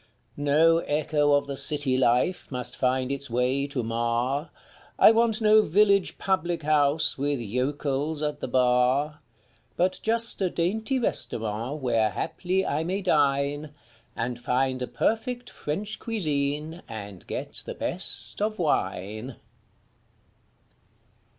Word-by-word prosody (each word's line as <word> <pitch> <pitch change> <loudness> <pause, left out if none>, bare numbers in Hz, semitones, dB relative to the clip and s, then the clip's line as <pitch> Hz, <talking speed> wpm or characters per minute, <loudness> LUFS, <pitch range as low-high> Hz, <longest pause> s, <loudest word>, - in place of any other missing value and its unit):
No 155 +3 +3
echo 150 -1 0
of 145 - +2
the 140 - -5
city 145 -2 +2
life 130 +8 +1
must 125 -2 -4
find 130 0 0
its 140 0 -3
way 125 +4 0
to 140 -3 -3
mar, 120 +6 -1 0.5
I - - +7
want 225 -1 +3
no 215 0 +6
village 200 +1 +2
public 175 -3 -1
house 150 -1 +1
with 145 -1 -1
yokels 140 +6 -2
at 150 -1 -3
the - - -4
bar; 130 +4 +1 0.6
But 185 +1 0
just 230 -1 +5
a 185 - +1
dainty 215 +11 -1
restaurant 120 - -2
where 115 -3 +2
haply 185 - -2
I 150 +3 -1
may 190 +4 -3
dine, 145 -2 0 0.4
And 120 +1 -3
find 130 +1 -1
a 125 - -2
perfect 245 +2 -2
French 200 +9 -5
cuisine 155 -5 -3
and 100 -4 -9
get - - -5
the - - -5
best - - +2
of 215 +1 -1
wine. 110 - -2
145 Hz, 125 wpm, -26 LUFS, 125-175 Hz, 0.6 s, I